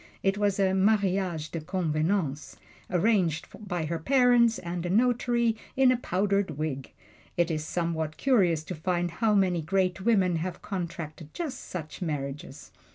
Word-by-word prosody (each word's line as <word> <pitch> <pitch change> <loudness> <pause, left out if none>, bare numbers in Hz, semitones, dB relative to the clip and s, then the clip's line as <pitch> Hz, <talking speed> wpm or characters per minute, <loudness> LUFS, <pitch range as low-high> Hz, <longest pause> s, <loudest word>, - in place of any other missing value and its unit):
It 195 0 +2
was 205 -1 0
a 190 -1 +3
"mariage 190 -5 +1
de 165 - -4
convenance" 155 -2 -1 0.3
arranged 180 -4 +2 0.2
by 175 -3 -2
her 165 +1 -2
parents 245 +1 +4
and 175 0 -4
a 175 - -3
notary 235 +1 +2 0.2
in 265 -1 +6
a - - +3
powdered 195 - 0
wig. 145 -4 -4 0.5
It 175 -1 +2
is 155 -1 -2
somewhat 160 -2 -2
curious 185 - +2
to 180 - -6
find 175 +1 -1
how 220 +2 +1
many 185 -4 +2
great 185 +2 0
women 190 -5 +3
have 170 +2 -5
contracted 170 -5 -5
just 325 -6 -4
such 160 -2 -6
marriages. 145 -3 -5
180 Hz, 150 wpm, -28 LUFS, 160-205 Hz, 0.5 s, in